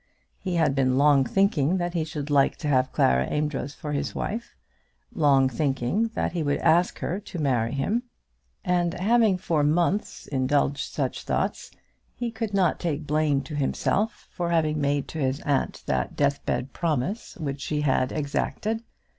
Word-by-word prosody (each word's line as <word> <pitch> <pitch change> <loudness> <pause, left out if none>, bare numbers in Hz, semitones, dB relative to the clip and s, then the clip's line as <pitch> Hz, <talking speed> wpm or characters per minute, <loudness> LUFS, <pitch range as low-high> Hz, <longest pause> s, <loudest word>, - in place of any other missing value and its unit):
He 185 -2 -3
had 160 -4 +3
been 130 -1 +2
long 140 -1 +5
thinking 185 -3 +2
that 175 -1 -2
he 165 -3 0
should 150 -2 -5
like 140 -1 +4
to 150 - -4
have 130 -2 +2
Clara 65 +1 +3
Amedroz 150 -2 -2
for 150 - -6
his 145 - -2
wife; 230 +3 -4 0.6
long 140 -7 +4
thinking 135 - 0
that - - 0
he 175 - -2
would 145 -2 +1
ask 175 +3 +3
her 185 - -2
to 200 -3 -9
marry 125 -7 +1
him; 195 - 0 0.6
and 175 -1 +1
having 215 +1 +3
for 165 -4 0
months 170 +7 0
indulged 140 +1 0
such - - -2
thoughts - - -2 0.5
he 240 -1 -3
could 225 -2 -3
not 185 -4 +2
take 155 -3 -2
blame 150 -2 +1
to 140 +3 -9
himself 195 +9 -1
for 175 -1 -2
having 155 -3 +1
made 140 0 0
to 160 - -5
his 135 0 0
aunt 140 -2 -1
that 65 -1 -1
deathbed 140 -2 -1
promise 170 - -2
which 140 -4 -4
she 150 +1 -1
had 130 -3 +1
exacted. 205 +9 -2
150 Hz, 165 wpm, -26 LUFS, 140-175 Hz, 0.6 s, long